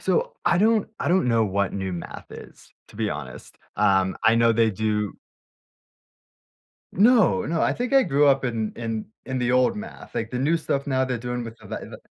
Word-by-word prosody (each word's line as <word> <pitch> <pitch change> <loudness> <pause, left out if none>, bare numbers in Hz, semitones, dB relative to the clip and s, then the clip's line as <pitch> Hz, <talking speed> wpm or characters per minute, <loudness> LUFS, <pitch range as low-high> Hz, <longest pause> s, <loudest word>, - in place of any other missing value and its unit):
So, 485 +1 0
I - - +3
don't 220 0 +3
I - - -1
don't 180 -8 +2
know 115 -1 +3
what 100 -1 -1
new 95 -2 -3
math 85 - -7
is, - - -13 0.2
to - - -16
be 110 -2 -1
honest, 70 -4 -8 0.2
um, 95 -1 +2
I 110 +1 +6
know 115 0 +4
they 115 0 +3
do 105 0 -1 1.8
No, 230 +2 +4
no, 165 -4 -1
I - - +2
think 250 +2 -3
I 270 -1 +6
grew 145 +1 +3
up 135 -1 +3
in 115 -4 -2
in 115 -2 -4 0.2
in 130 -1 -2
the 120 -1 0
old 125 - +3
math, 220 +2 -9
like, 115 0 -3
the 125 - -3
new 150 +6 +2
stuff 140 -3 -2
now 130 -1 +1
they're 125 -2 -2
doing 125 +1 -4
with 115 0 -9
the - - -14
the - - -5
the - - -10
120 Hz, 210 wpm, -24 LUFS, 110-160 Hz, 1.8 s, I